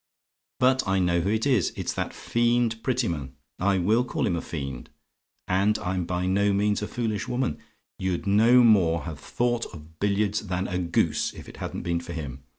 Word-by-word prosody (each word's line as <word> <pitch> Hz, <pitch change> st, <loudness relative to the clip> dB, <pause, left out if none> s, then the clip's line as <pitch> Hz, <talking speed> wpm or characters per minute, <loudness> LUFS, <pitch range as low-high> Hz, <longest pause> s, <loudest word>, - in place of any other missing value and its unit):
"But 130 Hz, -1 st, +3 dB
I 95 Hz, 0 st, +2 dB
know 85 Hz, -2 st, +2 dB
who 95 Hz, -, -1 dB
it 110 Hz, +1 st, 0 dB
is; 125 Hz, -10 st, +2 dB
it's -, -, -3 dB
that -, -, -3 dB
fiend 120 Hz, -1 st, +1 dB
Prettyman. 85 Hz, -, -2 dB, 0.2 s
I 100 Hz, +1 st, +2 dB
WILL 110 Hz, +7 st, +2 dB
call -, -, -1 dB
him 90 Hz, -, +1 dB
a 85 Hz, -, -2 dB
fiend, 70 Hz, -5 st, -6 dB, 0.6 s
and 100 Hz, +3 st, +2 dB
I'm 90 Hz, 0 st, -2 dB
by 90 Hz, +1 st, -2 dB
no 100 Hz, +2 st, +2 dB
means 105 Hz, +1 st, +1 dB
a 105 Hz, -, -2 dB
foolish 110 Hz, -4 st, -2 dB
woman: 125 Hz, -, -1 dB, 0.4 s
you'd 95 Hz, -2 st, -2 dB
no 115 Hz, +5 st, +5 dB
more 90 Hz, -8 st, +4 dB
have 80 Hz, -3 st, -6 dB
thought 120 Hz, -1 st, -1 dB
of 80 Hz, 0 st, -14 dB
billiards 105 Hz, +1 st, 0 dB
than 90 Hz, +1 st, -1 dB
a 90 Hz, 0 st, -2 dB
goose, 85 Hz, -2 st, 0 dB
if -, -, -10 dB
it -, -, -11 dB
hadn't -, -, -5 dB
been 85 Hz, -1 st, 0 dB
for 85 Hz, 0 st, -8 dB
him. 70 Hz, -5 st, -6 dB
100 Hz, 190 wpm, -26 LUFS, 85-110 Hz, 0.6 s, no